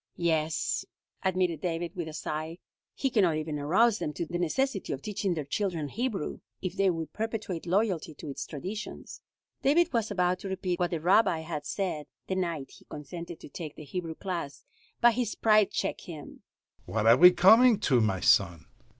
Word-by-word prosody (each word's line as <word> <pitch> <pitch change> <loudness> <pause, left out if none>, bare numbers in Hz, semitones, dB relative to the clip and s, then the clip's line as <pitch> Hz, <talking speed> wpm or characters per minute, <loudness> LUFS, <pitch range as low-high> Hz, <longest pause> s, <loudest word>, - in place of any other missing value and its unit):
"Yes," 160 -2 0 0.4
admitted 180 -4 0
David, 170 0 -3
with 170 -3 -4
a 155 - -7
sigh. 155 +2 -4 0.4
"He 270 - -1
can 225 - +3
not 170 -5 +2
even 155 -1 -3
arouse 200 +10 +3
them 150 - -3
to 170 - -3
the 175 +2 -4
necessity 195 - -1
of 135 - -7
teaching 195 -3 -1
their 155 -3 -3
children 165 -2 -2
Hebrew, 225 - -3 0.2
if 185 - -4
they 195 -1 +3
would 165 -3 -3
perpetuate 215 -6 -4
loyalty 180 -4 0
to - - -9
its 140 0 -6
traditions." 190 +8 -7 0.4
David 330 +4 +3
was 230 -2 +1
about 180 -2 +1
to 195 - -6
repeat 185 -2 -2
what 175 -1 +1
the 165 - -2
Rabbi 175 0 +3
had 155 -2 -5
said 175 -7 -3 0.2
the - - -3
night 170 -7 -2
he - - -17
consented 170 +3 -8
to - - -10
take 155 +1 -7
the - - -9
Hebrew 165 +2 -5
class, 170 -7 -5 0.4
but 240 0 +6
his 235 -2 -2
pride 215 -2 +4
checked - - -3
him: 155 -4 -10 0.5
"What 110 -1 -1
are 115 +1 +8
we 180 +4 +10
coming 220 +5 +6
to, 130 - +3
my 95 -4 0
son? 85 -1 +3
175 Hz, 185 wpm, -29 LUFS, 155-200 Hz, 0.5 s, we